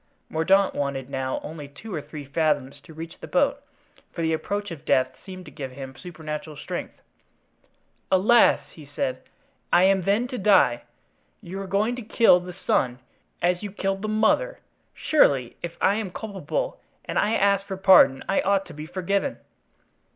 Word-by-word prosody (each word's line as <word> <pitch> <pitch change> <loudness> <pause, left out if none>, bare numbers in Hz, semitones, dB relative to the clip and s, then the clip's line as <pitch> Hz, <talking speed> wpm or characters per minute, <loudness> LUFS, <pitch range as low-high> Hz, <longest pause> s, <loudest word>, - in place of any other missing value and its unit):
Mordaunt 190 +5 +3
wanted 140 -2 -3
now 130 0 -2
only 150 -2 -7
two 190 +9 -10
or 155 - -2
three 145 0 -9
fathoms 145 -2 -1
to 165 - -15
reach 165 +1 -8
the - - -8
boat, - - +1 0.5
for 165 - -4
the 160 0 +1
approach 205 +4 -3
of 155 -3 -8
death 130 -3 +2
seemed 185 -2 -9
to 150 - -11
give 135 -4 -7
him 135 0 -8
supernatural 155 -2 -7
strength. - - -6 1.2
"Alas!" 215 +6 +5
he 150 -3 -13
said, 130 0 -2 0.5
"I 175 - +5
am 190 0 +4
then 205 +7 +1
to 250 - -4
die? 185 - +4 0.5
You 190 +3 -7
are 195 - -6
going 210 +5 +1
to - - -5
kill 220 -4 +5
the 180 0 -9
son, 125 -1 +1 0.5
as 175 0 +2
you 205 -2 -5
killed 195 -1 -2
the 215 - -3
mother! 220 - +2 0.4
Surely, 135 - +2
if 170 -1 -6
I 200 - +3
am 215 -4 -3
culpable 220 - -4 0.2
and - - -1
if - - +3
I 210 +2 +1
ask 200 0 +2
for 190 - -4
pardon, 185 -8 +6
I 195 - +2
ought 195 0 +1
to 175 - -11
be 150 +1 -8
forgiven." 195 +8 -1
180 Hz, 175 wpm, -25 LUFS, 150-200 Hz, 1.2 s, pardon